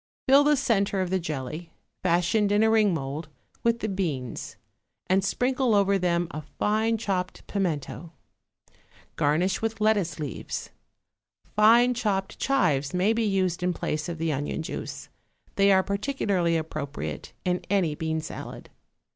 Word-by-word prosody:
Fill 275 +2 +7
the 295 0 +4
centre 200 -6 +1
of 185 -1 -1
the 190 - +2
jelly, 155 +1 -5 0.3
fashioned 180 +4 +2
in 205 +1 +4
a 220 - +4
ring 215 -3 +4
mould, 150 0 -4 0.3
with 235 0 +1
the 220 - -1
beans, 155 - -3 0.5
and 190 +1 +2
sprinkle 250 +3 +1
over 200 -1 +3
them 175 -1 +1
a 155 - -5
fine 215 +8 0
chopped 190 -4 -3
pimento. 170 -3 -3 1.0
Garnish 165 +6 +1
with 225 -1 -2
lettuce 205 -7 +2
leaves. 145 -6 -5 0.8
Fine 235 +4 +6
chopped 205 -5 -2
chives 160 - +1
may 190 +5 +3
be 230 - 0
used 190 -3 0
in 180 0 +1
the - - -11
place 155 +3 -2
of 170 - -4
the 160 -1 0
onion 145 +3 -3
juice; - - -6 0.5
they 200 0 +5
are 190 -1 +5
particularly 200 -6 0
appropriate 155 -3 -5
in 180 0 +1
any 185 -6 +2
bean 160 +1 -2
salad. 155 - -8
185 Hz, 145 wpm, -26 LUFS, 160-215 Hz, 1.0 s, Fill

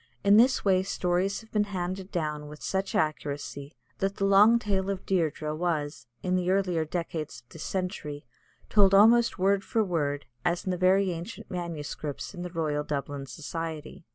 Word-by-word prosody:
In 200 +1 +6
this 250 +1 +4
way 185 -2 +4
stories 190 +1 0
have 220 - -19
been 210 -1 +2
handed 185 0 -4
down 150 -3 -2
with 150 0 -11
such 195 0 -2
accuracy, 145 -1 -2 0.2
that 195 +1 0
the 195 - 0
long 205 +4 +7
tale 195 -4 -1
of 195 -1 -3
Dierdre 160 -4 0
was, 155 -5 -2 0.2
in 185 0 +1
the 180 -1 0
earlier 185 -4 +2
decades 160 -5 -4
of - - -45
this 165 - -9
century, 180 -6 -4 0.4
told 195 -2 +5
almost 230 +4 +6
word 195 +1 +2
for 225 - +1
word, 145 -7 -1 0.2
as 175 0 0
in 185 - 0
the - - 0
very 185 +1 +3
ancient 180 +6 -7
MSS. 155 -4 -5
in 175 - -7
the 180 - -4
Royal 155 -3 -1
Dublin 140 -1 -4
Society. 165 +3 -6
180 Hz, 175 wpm, -28 LUFS, 155-195 Hz, 0.4 s, long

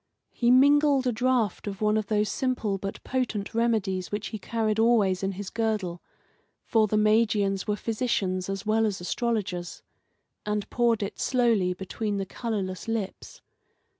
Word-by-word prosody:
He 240 - +1
mingled 280 +1 +5
a 250 - +2
draught 240 -4 0
of 200 -1 -5
one 215 0 +2
of 215 -2 -1
those 210 0 +1
simple 215 -3 -1
but 195 +1 -6
potent 245 -6 -2
remedies 215 -5 0
which 205 +1 -3
he 215 - -6
carried 220 +1 -1
always 215 -5 +3
in 195 0 -1
his 195 +1 -6
girdle 215 -7 -2 0.6
for 220 -2 +3
the 215 - 0
Magians 210 -2 +2
were 210 - +1
physicians 210 -5 -1
as 195 +1 -4
well 220 +1 +2
as 200 -3 -3
astrologers 195 -2 -3 0.6
and 210 -1 -2
poured 235 -3 +2
it 200 - -6
slowly 230 -8 +2
between 205 +3 -3
the 195 - -2
colourless 195 -2 -4
lips. 225 -4 -4
215 Hz, 155 wpm, -27 LUFS, 195-230 Hz, 0.6 s, mingled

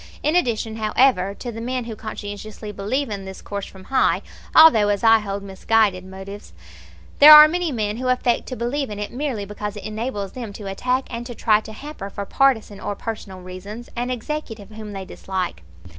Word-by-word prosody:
In 305 +3 +1
addition, 230 -8 0
however, 215 -3 +2
to 240 - -6
the 225 0 -7
men 250 +1 -2
who 225 -2 -6
conscientiously 210 0 -7
believe 215 +6 -2
in 195 -2 -5
this 190 0 -8
course 200 -1 -6
from 190 -1 -13
high, 265 +7 +1 0.3
although 235 -10 +8
as 205 +1 0
I 225 0 +7
hold 200 -1 -5
misguided, 200 0 +1
motives, 190 - -10 0.7
there 295 +2 +11
are 300 0 +11
many 345 0 -1
men 215 -3 -2
who 255 +1 -3
affect 250 -1 +1
to 255 - -5
believe 255 +3 -2
in 210 - -6
it 210 +2 -5
merely 250 -6 -3
because 210 +1 -6
it 205 - -8
enables 215 -2 -4
them 235 -5 -7
to 205 - -9
attack 250 +7 -1
and 235 - -4
to 240 - -8
try 215 -1 +3
to 220 - -10
hamper, 220 -3 -8
for 200 0 -6
partisan 220 -5 +1
or 205 - -4
personal 200 -4 -7
reasons, 200 +6 -9
an 245 +1 -2
executive 235 -4 -5
whom 215 -1 -8
they 195 -1 -6
dislike. 185 - -4
215 Hz, 195 wpm, -22 LUFS, 200-250 Hz, 0.7 s, there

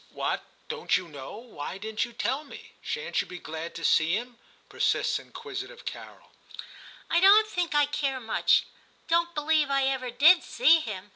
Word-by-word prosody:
' - - -30
What! - - 0 0.3
don't 470 - 0
you 180 -1 -7
know? 140 -1 -9
Why 205 -8 -7
didn't 215 +2 -2
you 240 - -12
tell 245 +5 -2
me? 445 +10 -13
Shan't 480 0 -2
you - - -9
be 180 - -8
glad 160 0 -7
to 165 - -7
see 165 +2 +3
him 240 +1 -6
} - - -29
' - - -36
persists - - 0
inquisitive 425 +1 -8
Carol. - - -9 0.4
* - - -18
I 340 - +4
don't 405 +4 +7
think 355 -6 -2
I 295 0 +5
care 280 -2 -2
much: 225 -3 +2 0.4
don't 340 +1 +1
believe 300 -1 +2
I 275 0 +2
ever 265 -2 -1
did 310 +9 +6
see 335 -9 +4
him.' 205 -8 -7
275 Hz, 195 wpm, -27 LUFS, 215-345 Hz, 0.4 s, don't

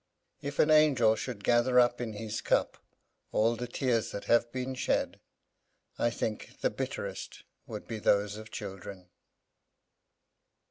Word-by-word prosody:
If 145 +1 -5
an 155 - +4
angel 135 -8 +5
should 110 -4 -5
gather 120 +2 +4
up 120 0 +3
in 115 -3 -3
his 105 0 -4
cup - - +1 0.5
all 115 +2 +2
the 125 +1 -5
tears 120 -2 0
that 100 - -6
have 120 0 +3
been 130 +1 -3
shed, 125 - -1 0.8
I 120 - +3
think 110 -2 -4
the - - +2
bitterest - - -5 0.2
would - - -7
be 110 -1 -4
those 105 0 +2
of 110 +1 -9
children. 95 -2 -8
115 Hz, 140 wpm, -30 LUFS, 110-125 Hz, 0.8 s, angel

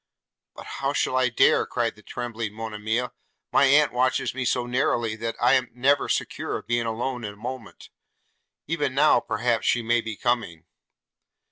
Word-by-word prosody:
'But - - -10 0.2
how - - 0
shall - - 0
I 130 -1 +3
dare?' 120 - +3
cried - - -1
the - - -17
trembling 115 -3 -5
Monimia: 110 +2 -3 0.4
'my 140 - +5
aunt 145 0 +4
watches 125 0 +1
me 130 0 -3
so 120 0 0
narrowly, 120 -3 0
that 115 0 -4
I 120 +1 +4
am 130 -1 +2
never 140 +3 +2
secure - - -2
of - - -11
being 120 -1 0
alone 120 +2 -3
a 105 -1 -6
moment: 120 +2 -8 0.8
even 145 -5 -2
now, 150 -2 +5
perhaps, 120 -1 -1
she 120 - +2
may 120 +1 +2
be 110 -1 -6
coming.' 115 -10 -1
120 Hz, 165 wpm, -25 LUFS, 115-130 Hz, 0.8 s, my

